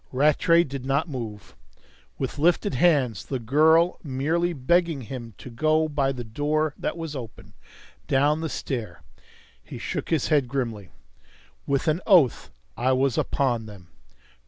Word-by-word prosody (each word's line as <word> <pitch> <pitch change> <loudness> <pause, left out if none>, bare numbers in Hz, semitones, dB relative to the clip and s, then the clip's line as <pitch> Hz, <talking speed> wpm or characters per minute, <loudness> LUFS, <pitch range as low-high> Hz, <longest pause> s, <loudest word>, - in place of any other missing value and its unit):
Rattray 155 +5 +4
did 140 -4 -6
not 140 +5 0
move. 115 -8 -7 0.6
With - - -4
lifted 170 0 +2
hands 130 - +2
the 135 - -3
girl 155 +8 +4
was 180 - -11
merely 155 +6 0
begging 165 +1 +1
him 120 -3 -8
to 125 - -10
go 155 +5 +2
by 140 -3 0
the 125 -2 -6
door 145 +6 -1
that - - -4
was 165 -3 -5
open, 120 -5 -9 0.5
down 145 +3 +2
the 160 - -3
stair. 120 -8 -5 0.6
He - - -9
shook - - -4
his 160 -5 0
head 145 -5 +3
grimly. 115 -7 -4 0.8
With 140 +3 0
an 155 +3 +1
oath 170 - +4 0.3
I 130 +2 +1
was 130 -1 +1
upon 120 -5 0
them. 95 -5 -13
140 Hz, 150 wpm, -25 LUFS, 125-155 Hz, 0.8 s, Rattray